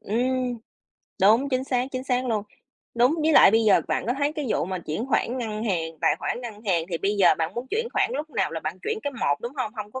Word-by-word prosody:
Ừm, 250 Hz, +2 st, -1 dB, 0.6 s
đúng, 225 Hz, +8 st, +5 dB
chính 260 Hz, 0 st, -1 dB
xác, 250 Hz, -2 st, 0 dB
chính 255 Hz, 0 st, -4 dB
xác 255 Hz, -1 st, 0 dB
luôn. 215 Hz, -4 st, -1 dB, 0.5 s
Đúng, 245 Hz, +6 st, +4 dB
với 315 Hz, +1 st, +3 dB
lại 275 Hz, -, +8 dB
bây 225 Hz, +1 st, +3 dB
giờ 205 Hz, -, +5 dB
bạn -, -, -1 dB
có 245 Hz, -, +1 dB
thấy 290 Hz, +1 st, +1 dB
cái 300 Hz, -4 st, -4 dB
vụ -, -, 0 dB
mà 185 Hz, 0 st, -4 dB
chuyển 170 Hz, -, -4 dB
khoản 255 Hz, -1 st, 0 dB
ngân 220 Hz, -2 st, -3 dB
hàng, 165 Hz, -6 st, -1 dB
tài -, -, +3 dB
khoản -, -, -3 dB
ngân 220 Hz, -3 st, -8 dB
hàng, 170 Hz, -4 st, +1 dB
thì 165 Hz, -, -2 dB
bây 200 Hz, +1 st, 0 dB
giờ 185 Hz, -4 st, +5 dB
bạn 165 Hz, +3 st, -2 dB
muốn 240 Hz, +2 st, -4 dB
chuyển 460 Hz, +2 st, -1 dB
khoản -, -, +1 dB
lúc 310 Hz, -5 st, -4 dB
nào 195 Hz, -8 st, 0 dB
là 165 Hz, -, -4 dB
bạn 165 Hz, +4 st, -5 dB
chuyển 440 Hz, 0 st, -2 dB
cái 285 Hz, -, -3 dB
một, 145 Hz, -, -1 dB
đúng 235 Hz, -, -5 dB
hông? 235 Hz, -5 st, -2 dB
Hông 210 Hz, -2 st, -7 dB
có 260 Hz, -, -5 dB
235 Hz, 265 wpm, -25 LUFS, 195-260 Hz, 0.6 s, lại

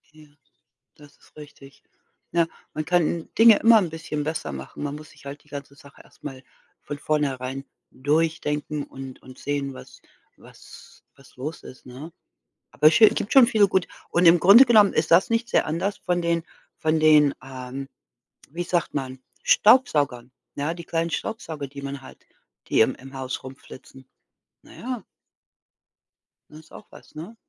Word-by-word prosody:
Ja, 155 Hz, -1 st, -17 dB, 0.7 s
das 145 Hz, -1 st, -18 dB
ist -, -, -25 dB
richtig. 140 Hz, -2 st, -14 dB, 0.5 s
Na, 170 Hz, -1 st, +2 dB, 0.3 s
man 155 Hz, 0 st, -4 dB
kann 170 Hz, -2 st, 0 dB
Dinge 225 Hz, -2 st, +8 dB
immer 225 Hz, -1 st, +6 dB
'n 180 Hz, -5 st, -2 dB
bisschen 155 Hz, -2 st, -5 dB
besser 155 Hz, -, -4 dB
machen, 65 Hz, -, -8 dB
man 145 Hz, 0 st, -4 dB
muss 155 Hz, 0 st, -11 dB
sich -, -, -19 dB
halt 140 Hz, +1 st, -9 dB
die -, -, -29 dB
ganze 140 Hz, -1 st, -8 dB
Sache 140 Hz, 0 st, -17 dB
erst -, -, -25 dB
mal 135 Hz, -3 st, -8 dB, 0.4 s
von 145 Hz, -, -7 dB
vornherein 135 Hz, -3 st, -2 dB, 0.3 s
durchdenken 150 Hz, +1 st, -1 dB
und 135 Hz, -2 st, -11 dB
und 130 Hz, 0 st, -14 dB
sehen, 140 Hz, -1 st, -3 dB
was -, -, -14 dB, 0.4 s
was -, -, -17 dB
was 135 Hz, -1 st, -21 dB
los 150 Hz, +6 st, -7 dB
ist, 130 Hz, -, -13 dB
ne? 140 Hz, +7 st, -10 dB, 0.6 s
Aber 155 Hz, -, +5 dB
sch -, -, +3 dB, 0.2 s
gibt 205 Hz, -, -3 dB
schon 265 Hz, -3 st, +7 dB
viele 210 Hz, -4 st, +3 dB
Gut, 190 Hz, -1 st, +1 dB, 0.2 s
und 175 Hz, +1 st, +1 dB
im 170 Hz, +1 st, +7 dB
Grunde 215 Hz, +9 st, +8 dB
genommen 215 Hz, -4 st, +5 dB
ist 155 Hz, +1 st, -1 dB
das 175 Hz, +6 st, +5 dB
nicht 230 Hz, +1 st, 0 dB
sehr -, -, +1 dB
anders 175 Hz, +6 st, -3 dB
von 175 Hz, -1 st, -1 dB
den 170 Hz, -1 st, 0 dB, 0.3 s
von 155 Hz, 0 st, 0 dB
den, 150 Hz, -2 st, +5 dB
ähm, 130 Hz, +1 st, -8 dB, 0.6 s
wie 175 Hz, +4 st, -4 dB
sagt 175 Hz, -2 st, -1 dB
man, 130 Hz, -2 st, -5 dB, 0.2 s
Staubsaugern. 155 Hz, -, +3 dB, 0.3 s
Ja, 145 Hz, +4 st, -2 dB
die 170 Hz, -1 st, -10 dB
kleinen 165 Hz, 0 st, -2 dB
Staubsauger, 160 Hz, -10 st, -5 dB
die 140 Hz, +1 st, -10 dB
man 140 Hz, 0 st, -6 dB
hat, -, -, -14 dB, 0.5 s
die -, -, +2 dB
im 110 Hz, +4 st, +3 dB
im 135 Hz, +1 st, -14 dB
Haus 130 Hz, -1 st, -5 dB
rum 130 Hz, +1 st, -10 dB
flitzen. 130 Hz, -1 st, -15 dB, 0.6 s
Na -, -, -17 dB
ja. 245 Hz, -4 st, -6 dB, 1.5 s
Das 155 Hz, -, -13 dB
ist 160 Hz, -, -20 dB
auch -, -, -13 dB
was, -, -, -17 dB
ne? 175 Hz, +9 st, -9 dB
150 Hz, 170 wpm, -24 LUFS, 135-170 Hz, 1.5 s, Dinge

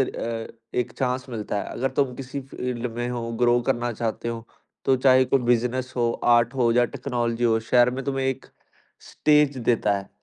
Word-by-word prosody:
अ, 115 Hz, -3 st, -2 dB, 0.3 s
एक 125 Hz, -, -1 dB
चांस 130 Hz, 0 st, -1 dB
मिलता 110 Hz, -4 st, -4 dB
है। -, -, -7 dB
अगर 135 Hz, +2 st, -1 dB
तुम 130 Hz, -3 st, 0 dB
किसी 135 Hz, +2 st, -6 dB
फील्ड 125 Hz, -2 st, -4 dB
में 120 Hz, 0 st, -2 dB
हो, 120 Hz, -1 st, -4 dB
ग्रो 120 Hz, 0 st, +4 dB
करना 120 Hz, -2 st, -1 dB
चाहते 115 Hz, +1 st, -3 dB
हो, 115 Hz, -1 st, -5 dB, 0.4 s
तो 135 Hz, -, +4 dB
चाहे 130 Hz, 0 st, +5 dB
तो 130 Hz, -, -13 dB
कोई 125 Hz, -3 st, -3 dB
बिज़नेस 125 Hz, +2 st, +1 dB
हो, 120 Hz, -1 st, +2 dB, 0.2 s
आर्ट 120 Hz, +1 st, +2 dB
हो 120 Hz, -3 st, +2 dB
या 120 Hz, +1 st, +4 dB
टेक्नोलॉजी 120 Hz, -2 st, -2 dB
हो, 115 Hz, -1 st, +3 dB
शहर 120 Hz, 0 st, +5 dB
में 130 Hz, +1 st, -5 dB
तुम्हें 135 Hz, -1 st, -1 dB
एक 130 Hz, -1 st, -3 dB, 0.6 s
स्टेज 150 Hz, -2 st, +3 dB
देता 115 Hz, -4 st, +1 dB
है। 100 Hz, -, -10 dB
125 Hz, 195 wpm, -24 LUFS, 115-130 Hz, 0.6 s, चाहे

